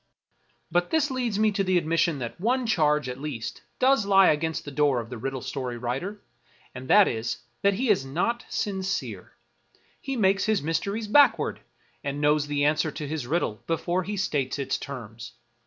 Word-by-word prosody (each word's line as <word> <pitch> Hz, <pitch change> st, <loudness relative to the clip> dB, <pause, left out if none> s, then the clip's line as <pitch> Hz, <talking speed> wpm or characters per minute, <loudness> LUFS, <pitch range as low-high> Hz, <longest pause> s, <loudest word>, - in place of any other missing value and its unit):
But 175 Hz, +1 st, +1 dB
this 305 Hz, -3 st, +1 dB
leads 245 Hz, -5 st, -1 dB
me 215 Hz, 0 st, +3 dB
to 195 Hz, -1 st, 0 dB
the 185 Hz, -1 st, +2 dB
admission 165 Hz, -1 st, +1 dB
that 125 Hz, +6 st, -6 dB
one 250 Hz, +4 st, +1 dB
charge, 150 Hz, -, +2 dB
at 125 Hz, +1 st, -6 dB
least, 140 Hz, -7 st, -5 dB, 0.2 s
does 265 Hz, -2 st, +4 dB
lie 195 Hz, -1 st, +6 dB
against 160 Hz, +1 st, -1 dB
the 145 Hz, -, -6 dB
door 140 Hz, -3 st, +2 dB
of 115 Hz, +1 st, -7 dB
the 125 Hz, -, -5 dB
riddle 135 Hz, +2 st, -4 dB
story 125 Hz, -3 st, -4 dB
writer; 135 Hz, -, -4 dB, 0.5 s
and 130 Hz, +1 st, -8 dB
that 205 Hz, +5 st, +6 dB
is, 115 Hz, 0 st, -3 dB, 0.2 s
that 200 Hz, 0 st, +3 dB
he 240 Hz, +2 st, +2 dB
is 185 Hz, -, +2 dB
not 180 Hz, -, -1 dB
sincere; 190 Hz, -2 st, -3 dB, 0.7 s
he 270 Hz, -1 st, -3 dB
makes 195 Hz, -4 st, +2 dB
his 215 Hz, -7 st, +1 dB
mysteries 200 Hz, +8 st, -2 dB
backward, 285 Hz, +6 st, +4 dB, 0.4 s
and 140 Hz, 0 st, -3 dB
knows 150 Hz, 0 st, +2 dB
the 145 Hz, 0 st, +1 dB
answer 155 Hz, +1 st, +2 dB
to 150 Hz, 0 st, -6 dB
his 145 Hz, -4 st, -4 dB
riddle 140 Hz, -8 st, -1 dB
before 175 Hz, +2 st, 0 dB
he 200 Hz, +3 st, -4 dB
states 145 Hz, -9 st, -1 dB
its 140 Hz, -, -2 dB
terms. 120 Hz, -4 st, -8 dB
160 Hz, 180 wpm, -26 LUFS, 140-200 Hz, 0.7 s, lie